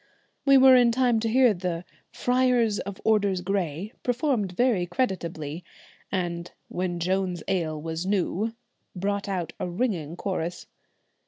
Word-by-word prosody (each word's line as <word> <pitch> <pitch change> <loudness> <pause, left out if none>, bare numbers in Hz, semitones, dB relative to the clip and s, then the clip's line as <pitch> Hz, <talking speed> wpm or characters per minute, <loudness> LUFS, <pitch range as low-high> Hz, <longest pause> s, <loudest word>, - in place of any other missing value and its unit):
We 275 -1 +7
were 260 0 +8
in 245 -2 +5
time 245 -2 +2
to 225 0 -1
hear 250 -1 +5
the 175 -2 -3 0.3
'Friar 250 -1 +2 0.2
of 200 -1 -6
Orders 200 -4 +2
Gray' 185 - -2
performed 245 - 0
very 220 -5 +2
creditably, 170 - -3 0.5
and 175 -2 -2 0.2
'When 175 -1 -2
Joan's 180 -1 -1
ale 165 -5 -1
was 160 +3 -4
new' 205 +3 0 0.4
brought 200 +2 -2
out 175 -4 -3
a 180 - -2
ringing 175 - -2
chorus. 180 -3 -3
190 Hz, 135 wpm, -26 LUFS, 175-230 Hz, 0.5 s, were